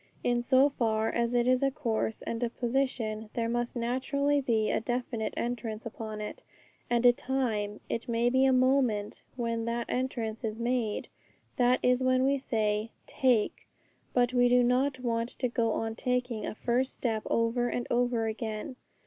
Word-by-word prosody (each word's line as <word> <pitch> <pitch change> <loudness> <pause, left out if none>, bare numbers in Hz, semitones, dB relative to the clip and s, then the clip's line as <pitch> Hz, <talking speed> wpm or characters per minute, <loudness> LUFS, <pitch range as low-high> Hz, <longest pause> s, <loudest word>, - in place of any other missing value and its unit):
In 240 0 +2
so 260 +3 +5
far 225 -5 0
as 235 +1 0
it 240 0 +3
is 255 +1 +3
a 275 - +3
course 225 -4 -2
and 230 0 -4
a 240 - +1
position, 235 -3 -2
there 230 -1 0
must 240 +1 -2
naturally 275 +4 0
be 225 -4 +1
a - - +1
definite 240 -1 -2
entrance 230 -2 -3
upon 220 -1 -6
it, 210 - -6 0.5
and 240 0 +2
a 245 - +8
time, 225 -6 -2
it 230 +2 -3
may 235 +1 +2
be 260 +2 +4
a 265 - +5
moment, 255 -5 +2
when 230 -2 -2
that 235 0 -1
entrance 240 -3 -2
is 220 0 -3
made. 235 -3 -1 0.5
That 250 -1 +4
is 250 +1 +3
when 255 0 +3
we 275 0 +2
say, 215 -3 0 0.2
'Take'; 245 -5 +1 0.4
but 245 0 +2
we 245 -1 +4
do 250 0 +5
not 260 +2 +2
want 230 -1 -1
to 255 - 0
go 230 -2 0
on 225 0 -2
taking 245 -1 -2
a - - -5
first 250 +3 0
step 225 -3 -1
over 235 +1 +1
and 245 - -2
over 240 -1 +1
again. 220 +2 -4
240 Hz, 175 wpm, -29 LUFS, 225-255 Hz, 0.5 s, a